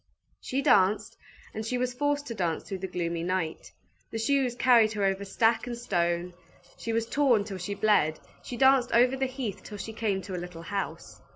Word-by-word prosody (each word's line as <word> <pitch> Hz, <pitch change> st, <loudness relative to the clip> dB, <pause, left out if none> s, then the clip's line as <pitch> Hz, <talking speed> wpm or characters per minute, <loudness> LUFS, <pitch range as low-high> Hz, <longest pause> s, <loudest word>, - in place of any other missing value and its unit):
She 270 Hz, +2 st, -2 dB
danced, 210 Hz, -7 st, +3 dB, 0.4 s
and 220 Hz, -, -4 dB
she 250 Hz, +3 st, -2 dB
was 250 Hz, 0 st, -1 dB
forced 290 Hz, +2 st, 0 dB
to 235 Hz, -, -5 dB
dance 175 Hz, -6 st, -1 dB
through 195 Hz, -, -6 dB
the 190 Hz, -, -4 dB
gloomy 170 Hz, -2 st, -2 dB
night. 180 Hz, -2 st, -2 dB, 0.4 s
The 225 Hz, -, -5 dB
shoes 255 Hz, +1 st, +1 dB
carried 235 Hz, -4 st, +5 dB
her 205 Hz, -1 st, -2 dB
over 195 Hz, 0 st, +1 dB
stack 225 Hz, +4 st, +1 dB
and 240 Hz, -1 st, -4 dB
stone; 175 Hz, -5 st, -1 dB, 0.4 s
she 230 Hz, -, -4 dB
was 225 Hz, 0 st, 0 dB
torn 245 Hz, -4 st, +3 dB
till 195 Hz, -2 st, -7 dB
she 200 Hz, +3 st, -4 dB
bled; 195 Hz, -8 st, +2 dB, 0.2 s
she 245 Hz, -, -7 dB
danced 265 Hz, -1 st, +4 dB
over 250 Hz, +3 st, +5 dB
the 265 Hz, 0 st, 0 dB
heath 255 Hz, -6 st, -5 dB
till 210 Hz, -, -8 dB
she 210 Hz, +3 st, -6 dB
came 205 Hz, -4 st, -1 dB
to 190 Hz, +1 st, -7 dB
a 180 Hz, -, -3 dB
little 175 Hz, -2 st, -8 dB
house. 200 Hz, +2 st, -5 dB
215 Hz, 200 wpm, -28 LUFS, 185-245 Hz, 0.4 s, carried